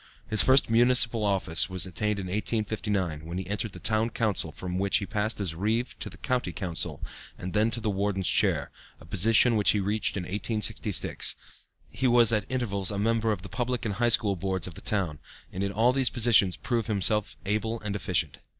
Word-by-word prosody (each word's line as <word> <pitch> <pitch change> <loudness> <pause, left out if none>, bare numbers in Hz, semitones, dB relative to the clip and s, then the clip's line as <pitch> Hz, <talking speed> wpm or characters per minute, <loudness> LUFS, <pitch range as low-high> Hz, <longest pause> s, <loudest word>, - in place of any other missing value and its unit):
His 110 -3 +5
first 130 +5 +4
municipal 120 -1 +4
office 95 -4 +1
was 95 -2 -1
attained 105 +4 -2
in 100 - -5
1859, 105 -4 -2
when 85 +2 -6
he 95 - -4
entered 105 +2 -4
the - - -9
Town 110 +1 +1
Council, 105 -9 -1
from 90 +3 -5
which 100 0 +2
he 100 - -3
passed 105 +3 -2
as 95 -5 -1
Reeve 110 +8 -1
to - - -4
the - - -13
County 125 -8 -2
Council, 85 0 -4 0.3
and 90 -1 -6
then 110 +3 +2
to 115 +1 -4
the 110 -2 -1
Warden's 100 -1 -2
chair, - - +1 0.3
a - - -15
position 115 +5 +3
which 105 -2 +3
he 105 - 0
reached 100 +1 -1
in 95 - -3
1866. 105 +2 -1 0.6
He 130 - -1
was 120 -1 +5
at 105 -3 0
intervals 105 -7 -1
a 100 - -2
member 115 +1 +1
of 95 -4 -4
the - - -7
Public 125 -1 -3
and 105 - -1
High 120 +4 +1
School 105 -3 +3
Boards 95 0 -3
of 90 - -6
the - - -11
town, 90 -8 -2 0.3
and 95 - -4
in 100 - -2
all 115 +4 +3
of - - -6
these 135 -2 +3
positions 110 -7 +3
proved 115 -3 -2
himself 105 0 0
able 110 +3 -2
and 105 -1 -4
efficient. 85 -7 -1
105 Hz, 205 wpm, -27 LUFS, 95-115 Hz, 0.6 s, His